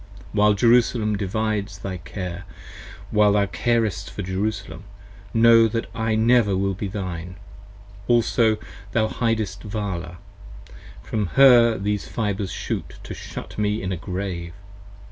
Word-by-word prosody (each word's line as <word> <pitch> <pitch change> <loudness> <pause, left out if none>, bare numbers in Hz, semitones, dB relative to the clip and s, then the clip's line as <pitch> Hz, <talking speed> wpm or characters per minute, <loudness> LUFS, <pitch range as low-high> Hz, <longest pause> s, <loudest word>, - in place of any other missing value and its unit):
While 105 0 +4
Jerusalem 115 -1 +3
divides 105 0 -2
thy 95 -1 -5
care, 90 0 -6 0.7
while 105 -1 +4
thou 100 -1 +3
carest 110 -2 -1
for 100 - -6
Jerusalem, 95 +3 -3 0.5
Know 115 0 +6
that 115 +1 -2
I 110 -1 0
never 110 -3 +3
will 95 0 0
be 100 +2 -4
thine: 90 -3 -5 0.7
also 115 -2 +3 0.4
thou 110 -2 +2
hidest 110 -4 -1
Vala: 95 -6 -4 0.9
From 105 -3 -2
her 120 -4 +7
these 105 +1 -2
fibres 105 -4 -2
shoot - - -4
to - - -7
shut - - -8
me 105 0 0
in 95 - -2
a - - -1
Grave. 90 -1 -5
105 Hz, 125 wpm, -23 LUFS, 95-110 Hz, 0.9 s, her